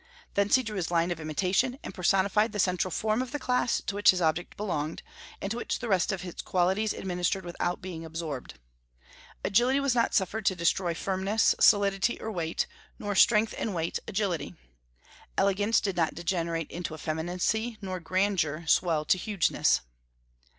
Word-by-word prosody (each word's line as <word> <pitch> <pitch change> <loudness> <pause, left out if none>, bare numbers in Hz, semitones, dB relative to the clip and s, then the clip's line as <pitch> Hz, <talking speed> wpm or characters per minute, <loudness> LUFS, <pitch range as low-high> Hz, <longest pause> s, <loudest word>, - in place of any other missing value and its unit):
Thence 200 +3 +3
he 260 - +2
drew 215 -3 -5
his 175 -3 -2
line 170 0 +1
of 170 - -3
imitation, 185 - 0
and - - -7
personified 195 +4 +2
the 210 - -3
central 180 -1 +1
form 215 +6 0
of 255 -1 -5
the 290 - -2
class 250 -3 0
to - - -2
which 205 +1 +4
his 185 - +5
object 165 +1 -1
belonged, 160 -7 -3 0.4
and 195 - -4
to 230 - -2
which - - -2
the 245 - -5
rest 190 -3 +2
of 190 -1 -4
its 175 - -6
qualities 190 +4 +1
administered 180 0 -2
without 175 0 -3
being 175 -3 -6
absorbed. 160 -5 -6 0.9
Agility 245 +7 +3
was 275 -2 +1
not 235 -1 +1
suffered 205 +3 0
to 190 - +3
destroy 170 0 +1
firmness, 195 +5 +1
solidity, 200 +1 +4
or 220 - -4
weight; 170 -4 -1 0.3
nor 205 0 -3
strength 215 +2 +4
and 210 -4 -2
weight, 165 0 -1
agility. 185 -7 -2 0.8
Elegance 205 +3 +3
did 195 -3 -2
not 165 -2 +1
degenerate 170 -2 -2
into 170 -2 -5
effeminacy, 180 +9 -2
nor 185 -2 -4
grandeur 175 -3 0
swell 160 -2 +2
to 185 - +3
hugeness." 200 -2 +2
190 Hz, 170 wpm, -28 LUFS, 170-210 Hz, 0.9 s, his